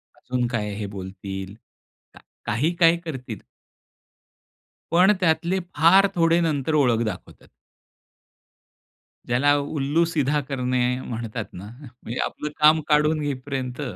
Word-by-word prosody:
अजून 125 -1 -2
काय 105 -4 -3
हे 105 0 -4
बोलतील, 95 +1 -7 0.6
का - - -15 0.3
काही 140 +11 0
काय 170 0 +4
करतील. 125 - -6 1.5
पण 185 +4 +6
त्यातले 170 +1 +1 0.2
फार 175 +6 +6
थोडे 165 0 +3
नंतर 155 -2 -1
ओळख 120 -6 +3
दाखवतात. 95 -4 -7 1.8
ज्याला 140 +4 +3
"उल्लू 145 +2 0
सीधा 150 -3 0
करणे" 125 -2 0 0.2
म्हणतात 115 -2 -5
ना, 95 +3 -9 0.4
म्हणजे 120 +2 -5
आपलं 150 - -5
काम 155 +1 +6
काढून 150 +1 +3
घेईपर्यंत 135 -2 -4
140 Hz, 110 wpm, -23 LUFS, 120-160 Hz, 1.8 s, पण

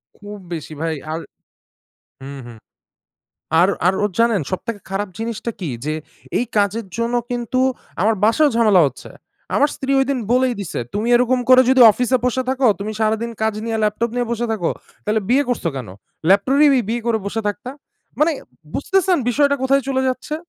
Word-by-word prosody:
খুব 205 0 -10 0.2
বেশি 160 -1 -6
ভাই। 165 0 -1 0.2
আর 160 - -2 1.0
হুম, 140 +1 -8
হুম। 120 -2 -11 1.0
আর, 180 - +5 0.2
আর 180 - +5
ওর 205 - 0
জানেন 230 -4 +3
সবথেকে 205 +3 -4
খারাপ 195 +1 -2
জিনিসটা 230 +1 -3
কী? 170 -6 -3
যে 155 +1 -1 0.4
এই - - +1
কাজের 205 +2 0
জন্য 235 +1 -1 0.2
কিন্তু 245 +1 -1 0.4
আমার 220 +4 +3
বাসায়ও 285 +7 +4
ঝামেলা 215 -5 +5
হচ্ছে। 135 -1 -8 0.4
আমার 290 - +4
স্ত্রী 270 0 -2
ঐদিন 270 0 0
বলেই 255 0 +2
দিছে 190 -9 -4
"তুমি 215 +3 -1
এরকম 250 +1 +2
করে 255 0 +8
যদি 260 0 +4
অফিসে 250 +3 +1
বসে 255 +1 0
থাকো, 260 0 +1
তুমি 210 +2 -3
সারাদিন 220 +2 0
কাজ 220 -1 +1
নিয়ে 225 -1 -2
ল্যাপটপ 215 +2 0
নিয়ে 245 -1 0
বসে 235 +1 -1
থাকো, 185 -7 -1 0.3
তাহলে 215 +1 +1
বিয়ে 265 +4 +4
করছো 240 -8 -1
কেন? 125 -5 -6 0.4
ল্যাপটপই 265 +7 +4
বিয়ে 235 +2 -1
করে 230 -2 +2
বসে 220 +3 -2
থাকতা।" 205 +5 -5 0.5
মানে 320 +2 +4 0.4
বুঝতেছেন 380 +3 +1
বিষয়টা 280 +3 +2
কোথায় 275 +1 +3
চলে 265 -1 0
যাচ্ছে? 255 +4 -3
230 Hz, 170 wpm, -20 LUFS, 205-260 Hz, 1.0 s, করে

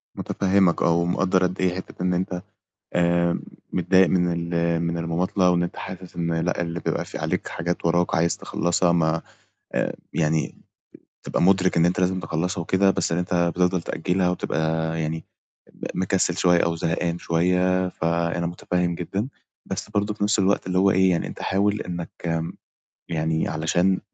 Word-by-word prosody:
متفهمك 95 -2 +2
آه، 85 - +4
ومقدَّر 90 +2 +2
قد 90 +1 -1
إيه 90 -1 +1
حتّة 95 -1 -8
إن 90 - +2
أنت 90 0 -2 0.5
آمم 85 0 +2 0.3
متضايق 95 +1 +4
من 85 -1 0
ال 85 0 +1
من 85 0 -1
المماطلة، 90 +3 +1
وإن 85 0 +2
أنت 85 - -4
حاسس 95 -1 -8
إن 85 -1 -1
لأ 85 +2 0
اللي 85 0 -3
بيبقى - - -2
فيه - - -7
عليك - - -2
حاجات 85 +1 -3
وَراك 85 +1 +2
عايز 85 +1 +2
تخلَّصها 85 0 +1
ما 80 -1 +2 0.5
آآ - - 0 0.2
يعني 80 -1 0 0.7
تبقى - - -1
مُدرِك 95 -1 +3
إن 85 - +5
أنت 90 +1 0
لازم 95 0 +1
تخلَّصها 85 +3 -2
وكده، 95 +3 +3
بس 85 - 0
إن 85 - +1
أنت 90 0 -2
بتفضَل 90 +1 +2
تأجلها 90 +3 0
وتبقى 80 -1 -1
يعني 80 +1 -3 0.5
م - - -5
مكسِّل 95 -2 +1
شوية 90 -1 +4
أو 85 0 0
زهقان 85 +1 -1
شوية، 90 +2 +1
فأنا 85 0 -1
متفهم 90 0 -1
جدًا. 95 +7 -3 0.4
بس - - -4
برضو 105 0 0
في 105 - -1
نفْس 105 +1 +2
الوقت 100 -1 +2
اللي 90 0 0
هو 95 +1 +5
إيه 95 0 +4
يعني، 85 - 0
أنت - - -8
حاول 100 +2 +1
إنك 85 -1 -3 0.7
يعني 80 -1 0
علشان 85 +4 +1
85 Hz, 165 wpm, -24 LUFS, 85-95 Hz, 0.7 s, إن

